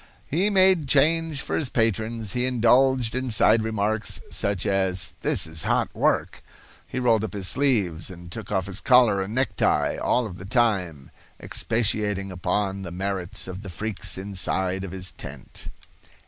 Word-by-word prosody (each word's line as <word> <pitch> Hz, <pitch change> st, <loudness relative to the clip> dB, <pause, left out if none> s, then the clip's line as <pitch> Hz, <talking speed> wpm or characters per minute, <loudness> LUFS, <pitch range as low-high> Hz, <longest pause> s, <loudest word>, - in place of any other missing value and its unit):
He 180 Hz, +8 st, +1 dB
made 190 Hz, -6 st, +4 dB
change 155 Hz, +2 st, +2 dB
for -, -, -3 dB
his 145 Hz, -5 st, -1 dB
patrons. 115 Hz, -2 st, -1 dB
He 125 Hz, 0 st, 0 dB
indulged 125 Hz, 0 st, +3 dB
in 130 Hz, +1 st, -2 dB
side 110 Hz, 0 st, +4 dB
remarks, 110 Hz, 0 st, -1 dB
such 100 Hz, -2 st, 0 dB
as 95 Hz, -2 st, 0 dB
"This -, -, +2 dB
is 80 Hz, -1 st, -2 dB
hot -, -, 0 dB
work." -, -, 0 dB, 0.5 s
He -, -, -7 dB
rolled 115 Hz, -4 st, +2 dB
up 110 Hz, -, -4 dB
his 100 Hz, -3 st, -2 dB
sleeves 105 Hz, -, 0 dB
and 90 Hz, -1 st, -11 dB
took 110 Hz, +1 st, -7 dB
off 95 Hz, -3 st, 0 dB
his 95 Hz, 0 st, -2 dB
collar 120 Hz, -6 st, +4 dB
and 100 Hz, +4 st, -5 dB
necktie, 110 Hz, -9 st, +1 dB
all 125 Hz, -, +1 dB
of 90 Hz, -5 st, -8 dB
the 95 Hz, -, -9 dB
time 95 Hz, -, 0 dB, 0.3 s
expatiating 105 Hz, -3 st, 0 dB
upon 95 Hz, +2 st, -1 dB
the 95 Hz, -, -6 dB
merits 95 Hz, +1 st, -3 dB
of 95 Hz, +1 st, -7 dB
the 100 Hz, -, -9 dB
freaks 100 Hz, +4 st, -2 dB
inside 95 Hz, -1 st, -1 dB
of 95 Hz, -, -5 dB
his 95 Hz, 0 st, -3 dB
tent. -, -, -10 dB
105 Hz, 160 wpm, -24 LUFS, 95-125 Hz, 0.5 s, made